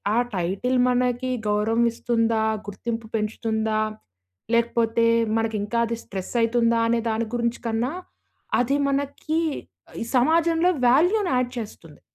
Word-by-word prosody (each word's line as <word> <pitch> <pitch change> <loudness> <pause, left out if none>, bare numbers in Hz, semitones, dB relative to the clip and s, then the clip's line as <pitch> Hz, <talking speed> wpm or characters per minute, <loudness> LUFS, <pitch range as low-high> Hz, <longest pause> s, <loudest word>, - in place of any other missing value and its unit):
ఆ - - +2 0.2
టైటిల్ 195 +8 -1
మనకి 250 0 0 0.2
గౌరవం 215 +3 +2
ఇస్తుందా? 230 -1 0 0.2
గుర్తింపు 225 +2 -5
పెంచుతుందా? 220 0 -1 0.7
లేకపోతే 230 0 +2 0.3
మనకి 225 -1 -1
ఇంకా 225 +3 -3
అది 230 - -2
స్ట్రెసైతుందా 230 +4 0
అనే 230 0 +2
దాని 225 +1 0
గురించి 235 0 -1
కన్నా, 230 +5 -1 0.7
అది 250 +3 +1
మనకి 285 +3 -1 0.6
ఈ - - 0
సమాజంలో 330 +5 +3 0.2
వాల్యూ‌ని 355 - +3
యాడ్ 250 -1 +1
చేస్తుంది. 175 -9 -8
235 Hz, 115 wpm, -24 LUFS, 225-250 Hz, 0.7 s, సమాజంలో